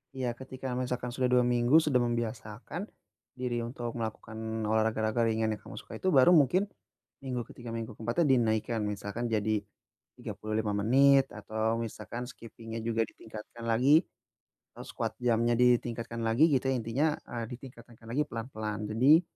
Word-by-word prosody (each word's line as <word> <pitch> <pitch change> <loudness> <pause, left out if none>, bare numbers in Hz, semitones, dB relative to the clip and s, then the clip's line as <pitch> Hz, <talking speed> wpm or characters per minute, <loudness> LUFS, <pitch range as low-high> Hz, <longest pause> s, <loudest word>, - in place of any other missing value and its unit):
Iya 130 -2 -1
ketika 130 0 -6
misalkan 125 -1 -2
sudah 125 +1 0
2 125 0 +4
minggu 120 +2 +3
sudah 140 -5 +3
membiasakan 120 - -3 0.5
diri 125 -2 -2
untuk 120 0 -4
melakukan 110 0 -4
olahraga 110 +1 +1
raga 120 - 0
ringan 110 0 +1
yang 105 - -4
kamu - - -10
sukai - - -8
itu - - -2
baru 135 +6 +7
mungkin 175 +3 +5 0.6
minggu 130 -3 -3
ke-3 120 -1 -9
minggu 115 0 -4
ke-4-nya 120 +10 0
dinaikkan 115 -2 +1
misalkan 105 +3 -3
jadi 110 -1 +1 0.6
35 110 0 -3
menit 135 +6 +5
atau 110 +2 -1
misalkan 115 +1 -5
skipping-nya 115 -2 -8
juga 115 0 +1
ditingkatkan 110 +2 -10
lagi, 135 +8 +5 0.7
atau - - -9
squat - - -3
jump-nya 120 -1 +2
ditingkatkan 120 -1 +1
lagi, 115 +7 +4
gitu. 135 -1 +2
Intinya, 130 +5 0
eee, 120 -1 -4
ditingkatkan 120 -2 -12
lagi 125 +6 0
pelan-pelan. 110 -3 -4
Jadi 135 +10 +6
120 Hz, 145 wpm, -30 LUFS, 110-125 Hz, 0.7 s, baru